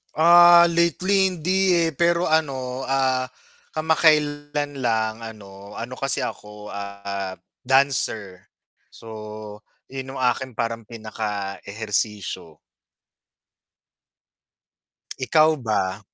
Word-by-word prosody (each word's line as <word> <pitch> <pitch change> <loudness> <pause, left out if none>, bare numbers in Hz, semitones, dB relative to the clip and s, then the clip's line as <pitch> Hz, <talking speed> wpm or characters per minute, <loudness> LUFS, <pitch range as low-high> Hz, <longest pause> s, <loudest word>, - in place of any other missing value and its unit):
Ah, 175 +2 +8
lately 180 +4 +2
hindi 185 +1 +1
eh - - -2
pero 170 +3 +1
ano, 135 -5 -1
ah, 130 -1 +1 0.5
kamakailan 150 -2 +1
lang 110 -3 0
ano 100 -3 -11
ano 120 +3 -6
kasi 135 0 -1
ako, 105 0 -8
ah, 100 -1 -5 0.3
dancer, 125 -8 +1 0.4
so 110 -1 -10 0.3
yun 135 0 -7
'yong - - -5
aking 130 +1 -6
parang 115 -1 -3
pinakaehersisyo. 105 -4 -4 2.6
Ikaw 155 +4 +3
ba? 100 -6 -1
125 Hz, 85 wpm, -23 LUFS, 105-155 Hz, 2.6 s, Ah